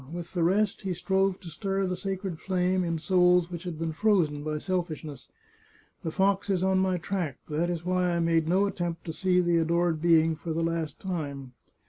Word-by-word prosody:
With 175 0 -7
the 175 - -1
rest 195 +5 +2
he 190 -3 -2
strove 190 +1 +1
to 175 - -8
stir 195 +4 -1
the 185 0 -1
sacred 190 -2 -4
flame 185 0 0
in 170 -1 -1
souls 180 +1 +3
which 175 +1 -6
had 175 -3 -4
been 165 0 -2
frozen 165 -6 +2
by 155 0 -2
selfishness. 155 -5 -4 0.7
The 165 - -3
fox 195 +4 +1
is 185 -2 +1
on 190 0 +3
my 185 -1 +1
track; 175 -4 -3
that 160 +3 0
is 170 -1 -3
why 180 -1 +1
I - - 0
made 165 -1 +2
no 190 +4 +3
attempt 175 -4 -3
to 165 - -4
see 180 +1 +2
the 175 -1 +2
adored 165 0 +1
being 165 -1 +4
for 160 +1 -5
the 165 +1 -1
last 165 -3 -2
time. 140 -8 -4
175 Hz, 200 wpm, -28 LUFS, 165-185 Hz, 0.7 s, being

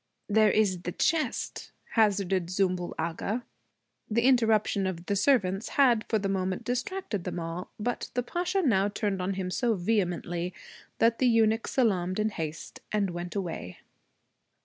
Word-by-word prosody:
'There 215 0 +4
is 195 -4 +2
the 180 - -4
chest,' 315 - -1 0.2
hazarded 195 -5 +2
Zümbül 185 -1 -1
Agha. 170 +8 -2 0.7
The 230 +2 +1
interruption 220 -6 +3
of 175 -2 -5
the 200 - 0
servants 200 -4 +2
had 245 -6 +4
for 220 - +3
the 200 -1 -2
moment 190 -1 -1
distracted 245 - -3
them - - -4
all. 165 +2 -5
But 240 +3 -2
the 245 - +1
Pasha 360 +7 -1
now 200 - +3
turned 205 -2 -2
on 190 +1 -1
him 185 -1 -3
so 235 +3 +1
vehemently 175 -3 -1 0.4
that 230 0 +3
the 255 - +4
eunuch 225 -1 +3
salaamed 185 -8 +1
in 215 0 +1
haste 160 -5 -6
and 205 -3 +1
went 175 +2 -6
away. 165 - -4
200 Hz, 150 wpm, -28 LUFS, 180-230 Hz, 0.7 s, There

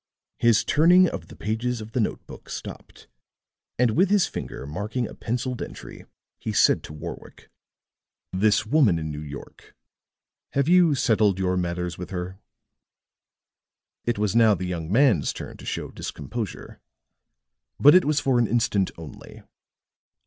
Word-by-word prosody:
His 115 -2 +4
turning 175 +4 +5
of - - -6
the - - -13
pages 115 +3 -2
of 110 0 -9
the 125 - -1
note 110 - -2
book - - -13
stopped, - - -9 0.7
and 125 -2 +3
with 180 - +3
his 205 -3 +4
finger 65 - -6
marking 105 - -3
a - - -10
penciled 125 +2 -3
entry, - - -9 0.3
he 110 - -4
said 90 -2 +4
to - - -10
Warwick: 75 - -10 0.8
"This 105 +3 +2
woman 115 - +3
in 80 -1 -4
New 75 0 -6
York 70 -2 -11 0.8
have 140 0 +1
you 175 -3 +5
settled 110 -7 +2
your 95 -1 0
matters 90 -1 -3
with 90 - -6
her?" 95 0 -5 1.6
It 120 -2 -1
was 105 0 0
now 110 -3 +5
the 95 - -5
young 85 -2 -4
man's 120 - +3
turn - - -8
to - - -12
show - - -4
discomposure. 115 -4 -6 1.0
But 145 - +8
it 185 0 +6
was 150 0 +1
for 135 -3 +1
an 120 - +2
instant 105 -4 +1
only. 80 -3 -11
110 Hz, 150 wpm, -24 LUFS, 90-130 Hz, 1.6 s, But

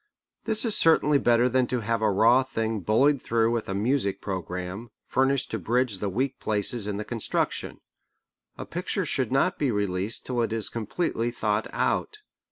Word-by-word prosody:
This 220 +1 +1
is 220 - +1
certainly 150 -3 +4
better 120 -1 +3
than 125 0 +1
to 125 -1 0
have 115 +1 -1
a 110 - +3
raw 115 +6 +5
thing 115 -4 -2
bullied 130 - +2
through 115 0 +1
with 115 -3 -2
a 95 - -2
music 100 -2 0
programme, 95 +3 -5 0.2
furnished 135 0 +1
to 110 - -2
bridge 115 +1 0
the 100 - -2
weak 130 +7 -2
places 105 +1 0
in 100 -1 -3
the 105 - -4
construction. 115 -3 -2 0.8
A - - -6
picture - - -3
should 130 -3 -1
not 135 +7 +1
be 145 - +1
released 100 0 -2
till 125 -2 -1
it 115 -2 -1
is 115 -2 -2
completely 115 - -2
thought 110 -2 -1
out. 425 - -1
115 Hz, 175 wpm, -26 LUFS, 105-130 Hz, 0.8 s, raw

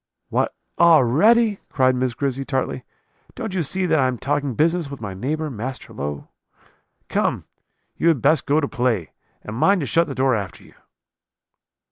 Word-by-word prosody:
"'What, - - 0 0.2
already?' 170 - +5
cried 130 -1 +2
Miss 125 -2 -1
Grizzy 135 -1 -2
tartly; 130 -2 -2 0.5
'don't 220 -6 -5
you 185 - 0
see 185 +5 -1
that 160 -3 +2
I 130 - +3
am 130 -1 -2
talking 140 0 -1
business 165 +1 +1
with 140 -1 -8
my 100 -3 -5
neighbour, 150 +10 -3
Master 125 +3 -6
Low? 70 0 -5 0.8
Come, - - -1 0.5
you - - +1
had 160 -5 +4
best 150 +6 +2
go 145 +2 +3
to 145 - -1
play, 120 - -1 0.3
and 105 - -7
mind 190 - +3
to - - -2
shut 165 +6 +2
the 135 - -5
door 130 0 +2
after 100 -5 -4
you.' - - -18
140 Hz, 170 wpm, -22 LUFS, 125-165 Hz, 0.8 s, already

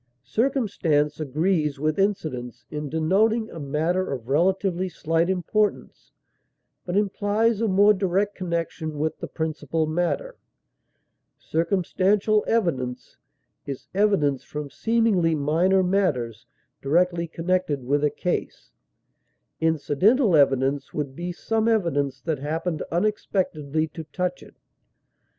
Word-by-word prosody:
Circumstance 170 - 0
agrees 155 0 0
with 155 +4 0
incident 155 - -2
in 150 -1 -4
denoting 210 - +1
a 165 - -8
matter 160 +6 -1
of 125 -4 -5
relatively 185 +4 +1
slight 165 +1 0
importance, 200 +3 -1 0.8
but 180 +2 0
implies 210 +2 +1
a 225 - +2
more 205 +2 +5
direct 195 +1 0
connection 170 -4 -3
with 155 +2 -2
the - - -5
principal 160 0 -2
matter; 175 - -2 1.0
"circumstantial 195 +5 +1
evidence" 145 - -1 0.5
is 140 -2 -6
evidence 185 -10 +2
from 150 -2 -6
seemingly 220 -8 +2
minor 170 +6 +2
matters 145 - 0 0.3
directly 170 +4 +1
connected 165 -4 -1
with 145 +3 +1
a 150 - +4
case; 175 +5 -4 0.9
"incidental 165 - +3
evidence" 135 -1 +2
would 140 -3 -3
be 175 +3 -4
some 220 +5 -1
evidence 145 - 0
that 155 -1 -2
happened 160 +3 -2
unexpectedly 165 -5 -1
to 160 - -8
touch 180 +3 -3
it. - - -15
170 Hz, 110 wpm, -24 LUFS, 150-195 Hz, 1.0 s, more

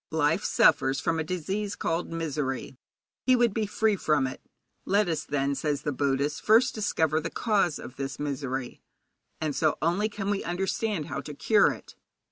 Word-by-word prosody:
Life 160 +4 +1
suffers 135 -3 +3
from 165 +1 0
a - - 0
disease 190 +5 -3
called 165 +1 -2
misery. 150 -6 -3 0.5
He 255 - +6
would 240 -4 +3
be 215 -1 -1
free 215 +1 +1
from 150 -7 +1
it. 130 - -5 0.4
Let 205 0 +2
us, 160 -2 -1
then, 140 -1 0
says 145 0 -2
the 150 - -1
Buddhist, 140 +1 0
first 235 +4 +4
discover 160 -7 +1
the - - -3
cause 200 -8 +1
of 130 - -10
this 135 0 -4
misery, 135 -3 -4 0.6
and 155 -3 -2
so 155 -2 +2
only 175 +7 +1
can 205 -1 -3
we 200 - -1
understand 190 0 -1
how - - -4
to 150 - -8
cure 210 +7 +4
it.' - - -10
160 Hz, 175 wpm, -27 LUFS, 145-205 Hz, 0.6 s, He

